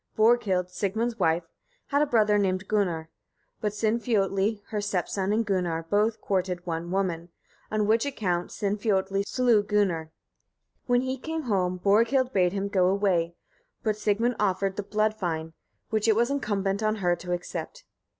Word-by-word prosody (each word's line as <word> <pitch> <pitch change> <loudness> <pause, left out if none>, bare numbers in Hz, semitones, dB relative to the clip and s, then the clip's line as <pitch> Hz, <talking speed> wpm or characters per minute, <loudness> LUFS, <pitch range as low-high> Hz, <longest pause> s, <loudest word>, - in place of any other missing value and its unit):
Borghild, 215 -5 +3
Sigmund's 220 +5 -2
wife, 165 +2 +2 0.5
had 285 0 +2
a 300 - +3
brother 215 -5 +3
named 190 0 0
Gunnar; 175 -7 0 0.5
but 210 - 0
Sinfiotli 210 -2 0
her 210 -1 -2
stepson 195 -1 -1
and 225 +2 +1
Gunnar 180 -5 -1
both 210 +2 +2
courted 180 -2 -1
one 170 0 -3
woman, 180 -3 -1 0.4
on 215 -1 0
which 220 +2 +3
account 180 -10 -1
Sinfiotli 200 -2 0
slew 245 -4 +3
Gunnar. 195 -6 0 0.8
When 245 0 +3
he 260 0 -3
came 320 +2 -4
home, 185 -6 0
Borghild 230 +7 +2
bade 180 -2 +3
him 200 +1 -2
go 185 -2 +2
away, 185 -4 +1 0.5
but 215 -2 +1
Sigmund 215 +3 0
offered 195 -1 0
the 205 - -2
blood 215 +2 0
fine, 165 -6 -3 0.4
which 220 0 +1
it 220 - +5
was 240 +4 +2
incumbent 200 -7 -1
on 215 0 +1
her 180 -4 +1
to 180 - -7
accept. 180 - -5
205 Hz, 155 wpm, -27 LUFS, 185-220 Hz, 0.8 s, it